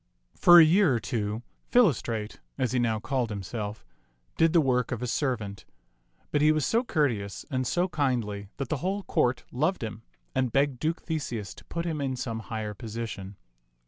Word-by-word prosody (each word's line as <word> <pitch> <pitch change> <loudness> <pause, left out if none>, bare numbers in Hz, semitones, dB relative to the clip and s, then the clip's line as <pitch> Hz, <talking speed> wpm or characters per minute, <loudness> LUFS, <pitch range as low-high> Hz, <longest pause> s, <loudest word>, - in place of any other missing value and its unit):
For 175 0 +8
a - - +10
year 170 -4 +4
or - - +1
two, 110 -1 -3 0.3
Philostrate, 115 - +2 0.2
as 130 -4 0
he 125 - +1
now 115 -2 +1
called 125 +1 -1
himself, 105 +1 -5 0.5
did 165 0 +4
the 170 - +5
work 125 -4 +1
of 120 -1 -3
a - - 0
servant; 115 -6 -2 0.7
but 145 - +2
he 155 +1 +6
was 155 -2 +1
so 230 +2 +2
cour 155 - +2
teous 100 -5 -5
and 130 -2 0
so 175 +8 +1
kindly 120 - -1
that 135 -3 -4
the 155 - 0
whole 195 +6 -2
court 125 -9 +1
loved 155 +5 0
him 110 0 -5 0.3
and 130 -2 +1
begged 135 -1 +1
Duke 160 +4 -1
Theseus 120 - -3
to - - -15
put 170 0 -4
him 160 -4 -2
in 135 -2 -1
some 115 -3 -3
higher 110 -2 -4
position. 105 -2 -6
125 Hz, 185 wpm, -28 LUFS, 110-155 Hz, 0.7 s, a